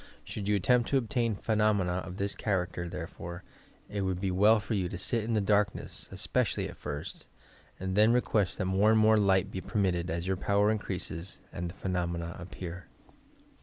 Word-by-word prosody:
Should 100 -2 -5
you 105 - +3
attempt 120 +5 +3
to 140 - +3
obtain 120 -3 0
phenomena 105 -4 +1
of 90 0 -5
this 100 0 -1
char 95 -5 0
acter, 85 -1 -6
therefore, 85 0 -7 0.4
it 100 - -3
would 95 -2 -1
be 95 0 -1
well 105 +4 +5
for 105 - -4
you 95 -4 0
to 95 - -5
sit 115 +5 0
in 115 +1 -1
the 105 - +3
darkness, 100 0 0
especially - - 0
at - - -9
first, 75 +1 -6 0.5
and 95 0 -2
then 105 +2 +6
request 110 -6 +1
that 95 - -1
more 95 +3 +3
and 110 0 +5
more 110 0 +5
light 95 -2 +3
be 95 - -4
permitted 90 -4 0
as 85 +1 -2
your 95 0 0
power 100 +2 +3
increases 95 -4 -4 0.2
and 85 0 -3
the 85 - -10
phenomena 85 -2 -2
appear. 90 0 -7
95 Hz, 190 wpm, -30 LUFS, 90-105 Hz, 0.5 s, then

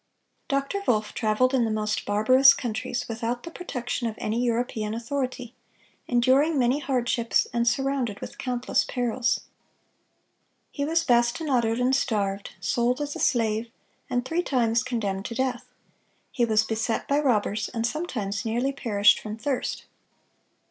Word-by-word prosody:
(600) 275 - +3 0.2
Dr. - - -9
Wolff 215 -3 +1
traveled 225 +4 +1
in 255 -3 +3
the 225 - 0
most 215 -1 -1
barbarous 255 +7 +6
countries, 240 +1 -3
without 230 +2 -3
the 335 - -8
protection 250 -8 -4
of 220 - -4
any 225 +3 -1
European 230 -3 -1
authority, 250 0 -4 0.5
enduring 265 +6 +3
many 255 +2 +2
hardships, 245 -4 +1
and 235 0 +1
surrounded 255 -3 0
with - - -9
countless 250 -1 0
perils. 245 0 0 1.3
He 285 - -2
was 330 +2 +1
bastinadoed 240 -1 +2
and 255 +2 +3
starved, 200 -6 -1
sold 235 +7 0
as 290 0 -3
a - - -6
slave, 225 -2 +1 0.4
and 245 -1 -1
three 330 +6 0
times 240 -7 +1
condemned 200 -5 -3
to 230 - -5
death. 255 0 -2 0.6
He 240 - +1
was 215 -1 +3
beset 220 +1 -2
by 285 +1 +2
robbers, 215 -6 +1
and 230 0 -2
sometimes 240 - -3
nearly 240 +4 0
perished 210 -7 +3
from 215 0 -6
thirst. 265 +2 -3
240 Hz, 145 wpm, -26 LUFS, 220-260 Hz, 1.3 s, barbarous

